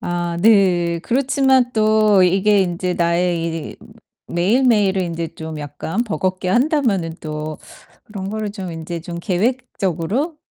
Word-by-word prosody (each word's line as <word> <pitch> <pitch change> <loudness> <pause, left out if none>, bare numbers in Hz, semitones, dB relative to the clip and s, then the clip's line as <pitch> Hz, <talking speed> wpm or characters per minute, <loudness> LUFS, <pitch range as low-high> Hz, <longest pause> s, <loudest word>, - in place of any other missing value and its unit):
아 175 -1 -2
네. 180 -5 +3
그렇지만 265 +1 +2
또 215 -3 +4
이게 195 +3 +3
인제 180 0 -2
나의 170 0 +1 0.3
이 - - -17 0.5
매일매일을 200 0 +2
인제 170 -1 -3
좀 160 -1 -7
약간 145 +9 -3
버겁게 185 -4 -2
한다면은 235 - +1
또 155 0 -5 0.5
그런 195 -2 -6
거를 215 -1 -3
좀 190 -4 -6
인제 165 +1 -6
좀 170 +1 -7
계획적으로 210 - -1
185 Hz, 255 characters per minute, -19 LUFS, 170-220 Hz, 0.5 s, 또